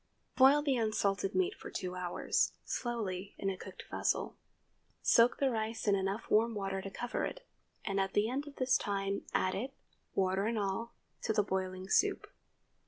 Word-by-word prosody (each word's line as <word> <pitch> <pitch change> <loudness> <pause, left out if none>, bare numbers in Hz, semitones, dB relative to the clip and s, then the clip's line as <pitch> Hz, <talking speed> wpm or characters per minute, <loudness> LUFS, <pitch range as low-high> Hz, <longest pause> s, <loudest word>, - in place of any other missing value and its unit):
Boil 275 +2 +7
the 275 -3 +2
unsalted 200 -3 0
meat 375 +2 +2
for - - -9
two 180 -1 -4
hours, 180 -1 0
slowly, 205 -6 -3
in 195 - -1
a - - -4
covered - - -9
vessel. - - 0 0.7
Soak 235 +1 +5
the 275 -2 +2
rice 220 0 -2
in 205 - +5
enough 195 +2 -1
warm 225 +2 +3
water 195 -1 -2
to 195 - -6
cover 240 +5 -3
it, - - -4 0.4
and 195 -2 0
at 195 0 0
the 205 +1 +3
end 275 +5 -2
of 285 - -10
this 255 0 +3
time 195 -1 -2
add 185 - +2
it, 260 +7 -4 0.4
water 190 +1 +2
and 230 0 0
all, 210 +3 -2 0.3
to 220 - 0
the 210 - +3
boiling 185 -1 -3
soup. - - +2
205 Hz, 175 wpm, -33 LUFS, 195-240 Hz, 0.7 s, Boil